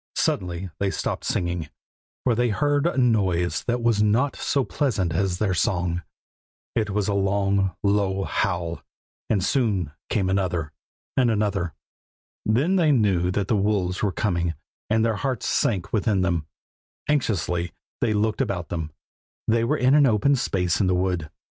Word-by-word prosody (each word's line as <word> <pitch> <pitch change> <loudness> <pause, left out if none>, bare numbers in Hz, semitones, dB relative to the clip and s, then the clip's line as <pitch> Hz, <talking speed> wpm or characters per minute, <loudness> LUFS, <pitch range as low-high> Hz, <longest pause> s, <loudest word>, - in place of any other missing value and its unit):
Suddenly 90 0 -1
they 100 - +1
stopped - - -3
singing, 85 -3 -1 0.5
for 125 - +3
they 120 +1 +1
heard 145 +6 +1
a 170 - -2
noise 95 -9 +2
that 120 -1 -1
was 115 -3 +3
not 115 +7 +2
so 140 - 0
pleasant 105 - 0
as 90 +1 0
their 100 -1 +1
song; 90 0 0 0.7
it 110 -2 0
was 105 -1 0
a 105 - +1
long, 100 -1 +1
low 100 -1 +1
howl, 85 -5 -1 0.5
and 100 -4 +2
soon 100 - +1 0.2
came 100 -4 +1
another, 90 -5 0 0.4
and 125 -2 +3
another. 105 -6 0 0.7
Then 140 - +2
they 160 -4 +4
knew 100 -9 +2
that 95 +1 -1
the - - +2
wolves 100 -3 0
were 100 - +1
coming, 85 -4 -1 0.3
and 110 +1 +3
their 115 -2 +1
hearts 130 0 -2
sank 95 -7 0
within 105 -3 +2
them. 85 -4 0 0.6
Anxiously 90 - 0 0.3
they 110 - +1
looked 105 +1 +1
about 90 -4 -2
them. 80 -2 -3 0.6
They 115 +1 +3
were 115 - +1
in 130 +2 +3
an 145 -2 +6
open 125 +5 +3
space 90 -8 0
in 95 - +2
the 90 - +2
wood. 90 -4 -1
100 Hz, 160 wpm, -24 LUFS, 90-115 Hz, 0.7 s, an